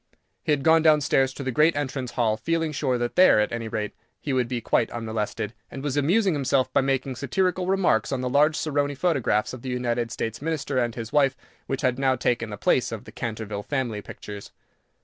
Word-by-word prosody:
He - - -1
had 140 -2 +1
gone 160 +1 +5
down 155 -1 +5
stairs 135 -1 +2
to 140 - -5
the 130 - -2
great 155 +6 +3
entrance 135 -3 -3
hall, 110 -3 +1
feeling 165 +7 -1
sure 135 -4 0
that 120 0 -3
there, 185 -11 +6
at 105 - +1
any 115 -1 -3
rate, 105 -1 -3 0.3
he 140 - -3
would 125 -2 +1
be 125 0 -2
quite 115 - +1
unmolested, 110 -2 -3 0.2
and 135 - -8
was 145 -2 -2
amusing 180 +7 +3
himself 135 -2 +1
by - - +4
making 135 -1 -1
satirical 180 +7 0
remarks 185 - +2
on 130 -2 -1
the 125 - -1
large 150 +4 +3
Saroni 145 -2 -1
photographs 130 -11 +1
of 130 - -8
the 130 - -5
United 120 -1 -1
States 115 -1 -4
Minister 145 -4 -1
and 120 -2 -1
his 115 -2 -6
wife 135 -3 +3 0.3
which 135 - -2
had 130 0 +1
now 135 -1 +3
taken 120 -2 -1
the 105 - -6
place - - +1
of - - -5
the - - -12
Canterville 110 -3 -4
family 120 -4 -2
pictures. 100 0 -9
130 Hz, 215 wpm, -25 LUFS, 115-145 Hz, 0.3 s, there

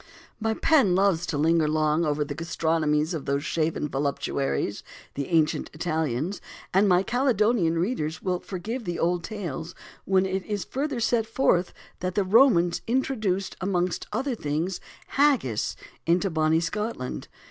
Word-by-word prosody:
My 220 0 0
pen 265 - +4
loves 185 -3 +2
to 150 - -2
linger 160 +1 +3
long 155 +1 +2
over 150 0 0
the 145 - -5
gastronomies 160 0 0
of 155 -4 -4
those 140 +1 0
shaven 155 -2 -1
voluptuaries, 140 -5 -1 0.3
the 140 -1 -3
ancient 160 -3 +1
Italians; 160 +1 -2 0.3
and 195 +2 +4
my 180 +1 +4
Caledonian 220 -8 +2
readers 170 -4 -1
will 180 -2 -1
forgive 215 +8 -5
the 175 -1 -3
old 175 +1 0
tales 170 -6 -5 0.3
when 190 0 +3
it 190 0 -2
is 205 -3 -2
further 275 -1 -3
set 230 -1 +1
forth 190 -7 +2 0.3
that 185 0 -3
the 205 - +3
Romans 190 -4 +4
introduced, 220 -6 0
amongst 180 -2 -1
other 270 0 -1
things, 165 -1 -2 0.3
Haggis 270 - +2 0.3
into 180 +3 +2
Bonnie 160 0 +2
Scotland. 180 - -3
175 Hz, 145 wpm, -26 LUFS, 155-210 Hz, 0.3 s, pen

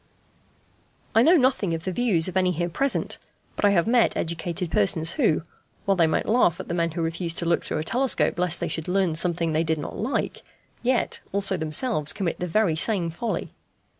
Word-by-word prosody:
I 225 - +5
know 335 +8 +5
nothing 250 - +1
of 160 - -7
the 185 - -3
views 190 -6 +2
of 185 - -6
any 185 -1 +2
here 175 +1 -2
present; 275 +11 -1 0.4
but - - 0
I - - +6
have 175 -4 +2
met 235 0 +2
educated 170 +1 -3
persons 160 +11 +2
who, 215 - +1 0.4
while 195 - +2
they 170 -3 +3
might 155 - 0
laugh 210 -7 +2
at - - -7
the - - -4
men 170 -1 0
who 165 +1 -4
refused 165 0 -3
to 170 - -1
look 170 0 +1
through - - -3
a 155 - -2
telescope 250 -2 +1
lest 180 -1 +2
they 170 - -2
should 160 0 -3
learn 185 -2 +1
something 170 0 0
they 155 +1 +1
did 160 -1 -1
not 150 - -6
like, 245 +6 -3 0.4
yet 250 0 0
also 195 0 +1
themselves 160 - +2
commit 180 -4 -3
the 180 - -3
very 185 -2 +1
same 175 -1 +2
folly. 225 +8 -4
175 Hz, 205 wpm, -24 LUFS, 165-210 Hz, 0.4 s, I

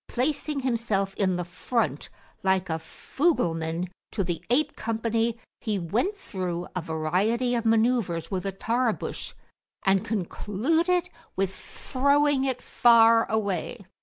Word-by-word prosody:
Placing 285 +2 -1
himself 225 -6 0
in 190 -3 +1
the 180 0 -2
front, 230 +7 -2 0.3
like 190 -2 +1
a 160 - -1
fugleman 165 - -1 0.2
to 200 - -1
the 175 -2 -3
ape 275 +6 +2
company, 230 +1 -1 0.2
he 215 -3 -1
went 225 - -1
through 180 - -4
a 180 - -1
variety 185 +10 0
of 235 -1 -1
manuvres 220 -7 +2
with 190 0 -2
a - - -1
Tarbush, 230 +4 -2 0.5
and 195 0 +3
concluded 285 - 0 0.2
with 190 0 0
throwing 280 +5 +1
it 255 -2 -2
far 230 -1 +5
away. 205 0 -2
220 Hz, 125 wpm, -26 LUFS, 185-250 Hz, 0.5 s, far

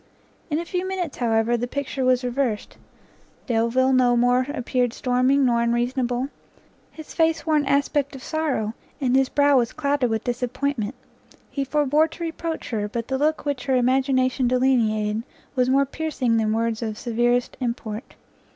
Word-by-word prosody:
In 300 - 0
a 340 - -3
few 360 +1 -2
minutes, 365 -5 -3
however, 230 -1 +2
the 240 +1 -2
picture 275 0 -3
was 255 0 +3
reversed; 245 -3 -2 0.7
Delvile 245 +2 +2
no 245 -2 +4
more 245 +2 +3
appeared 250 -3 -1
storming 255 +2 +2
nor 235 -2 +2
unreasonable; 245 +2 0 0.6
his 315 -1 -11
face 325 0 +1
wore 315 -1 +2
an 290 -2 +1
aspect 280 0 +1
of 265 - -10
sorrow, 290 -9 -1 0.3
and 260 -3 +1
his 270 -1 +3
brow 285 -1 +4
was 235 -2 -1
clouded 280 -4 0
with 220 -1 -1
disappointment; 250 -1 -2 0.6
he 275 - -1
forbore 295 +2 +2
to 330 +2 -8
reproach 330 -2 -4
her, 210 -2 -1
but 230 +3 -5
the 265 0 -1
look 310 +2 +1
which 285 -3 -2
her 265 -2 +2
imagination 255 0 +2
delineated 225 -4 +2 0.3
was 250 -1 +2
more 275 +1 +4
piercing 275 -5 -1
than 215 -1 +1
words 225 0 -1
of 220 -2 -3
severest 240 +1 0
import. 235 -2 -4
255 Hz, 160 wpm, -23 LUFS, 235-280 Hz, 0.7 s, no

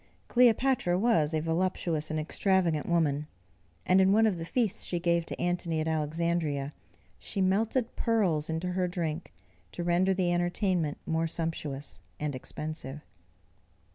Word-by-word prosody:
Cleopatra 245 -6 +3
was 175 -8 +3
a 155 -1 0
voluptuous 165 -1 -1
and 155 0 -1
extravagant 170 -1 +1
woman, 150 -3 +1 0.6
and 185 +1 +5
in 190 0 +5
one 220 +2 +5
of 205 -5 +1
the 165 - -4
feasts 220 0 0
she 175 - -2
gave 170 -1 +1
to - - -6
Antony 175 -2 -1
at 155 - -1
Alexandria, 155 -2 -1 0.5
she - - -5
melted 220 +6 +1
pearls 185 -10 +1
into 165 +3 -2
her 180 0 0
drink 170 -2 -3 0.4
to 175 - -4
render 180 +2 +2
the 180 -2 +1
entertainment 175 -3 0
more 165 0 0
sumptuous 155 - -4 0.2
and 150 -1 -2
expensive. 150 +2 -6
170 Hz, 140 wpm, -29 LUFS, 155-190 Hz, 0.6 s, and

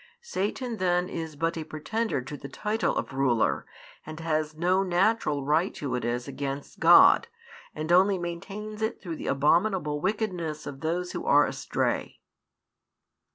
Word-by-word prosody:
Satan 235 - -3
then 180 -1 +1
is 160 -4 -5
but 165 +3 -1
a 160 - -4
pretender 155 - -2
to 135 +3 -7
the 140 0 -9
title 210 +9 -1
of - - -3
ruler, 130 -4 +1 0.4
and 155 +1 -8
has 155 -1 -1
no 180 +3 +2
natural 180 -6 +1
right 160 +6 +2
to 140 -3 -4
it 125 - -2
as 120 +2 -2
against 140 0 -5
God, 170 - +7 0.5
and 155 +2 -3
only 190 +2 +5
maintains 195 +5 -6
it 220 +2 -1
through 170 -4 -6
the - - -6
abominable 150 +1 +2
wickedness 180 -6 -2
of 135 -1 -7
those 175 +4 -2
who - - -5
are 145 +1 +6
astray. - - -2
165 Hz, 155 wpm, -27 LUFS, 150-195 Hz, 0.5 s, God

